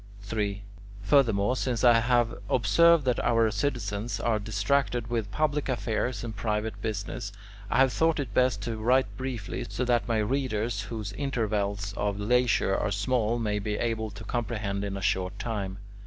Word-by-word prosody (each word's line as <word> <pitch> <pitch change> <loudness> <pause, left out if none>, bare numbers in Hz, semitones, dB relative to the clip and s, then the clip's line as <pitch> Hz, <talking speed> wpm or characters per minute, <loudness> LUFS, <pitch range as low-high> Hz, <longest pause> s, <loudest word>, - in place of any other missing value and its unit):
3. 105 -1 -3 0.4
Furthermore, 115 -3 +3
since 125 -3 -1
I 120 -2 +7
have 120 -1 +2 0.2
observed 170 +4 +4
that 125 -2 +1
our 115 -2 +3
citizens 105 -1 -2
are 110 -2 +1
distracted 115 +3 0
with 115 -3 -1
public 150 +3 0
affairs 120 -2 -1
and 115 -2 -5
private 105 +1 -2
business, 100 -2 -4 0.4
I - - +1
have 130 -1 +4
thought 160 -1 +2
it 125 -7 -4
best 125 -5 +2
to 115 0 -3
write 125 +4 +2
briefly, 125 -2 -4
so 125 - -2
that 120 -4 +1
my 115 -2 +1
readers, 115 0 -1
whose 110 -4 -5
intervals 105 -6 -1
of 100 0 -1
leisure 120 -2 +2
are - - 0
small, 110 +3 0
may 105 -3 -1
be 105 +1 -2
able 110 -2 -1
to 100 +2 -10
comprehend 110 -4 -2
in 100 -1 -3
a 95 - -6
short 90 0 0
time. 100 -4 -3
110 Hz, 165 wpm, -28 LUFS, 105-125 Hz, 0.4 s, I